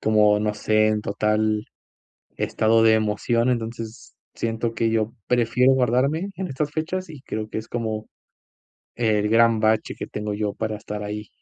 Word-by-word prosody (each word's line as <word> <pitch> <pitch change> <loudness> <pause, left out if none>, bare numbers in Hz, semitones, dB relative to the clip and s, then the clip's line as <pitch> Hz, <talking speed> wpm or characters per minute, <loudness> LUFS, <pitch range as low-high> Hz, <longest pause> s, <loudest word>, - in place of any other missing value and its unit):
como, 105 -1 +4
no 105 0 -1
sé, 110 0 +2
en 110 0 +1
total 105 +1 0 0.7
estado 115 +1 +2
de 110 0 +6
emoción. 110 +3 +1
Entonces, 115 -1 -5 0.2
siento 115 0 -2
que 115 - +1
yo 110 0 0
prefiero 125 +2 +3
guardarme 130 - +1
en 190 0 -3
estas 145 +2 -2
fechas, 175 +3 -3
y 150 -4 -10
creo 110 -4 -4
que - - -3
es 110 - -8
como 110 -2 -3 0.9
el 110 -3 +1
gran 115 0 +4
bache 110 0 +1
que - - -6
tengo 105 0 -4
yo 105 0 -2
para 110 0 -3
estar 105 0 -6
ahí. 105 +1 -5
110 Hz, 165 wpm, -23 LUFS, 105-120 Hz, 0.9 s, de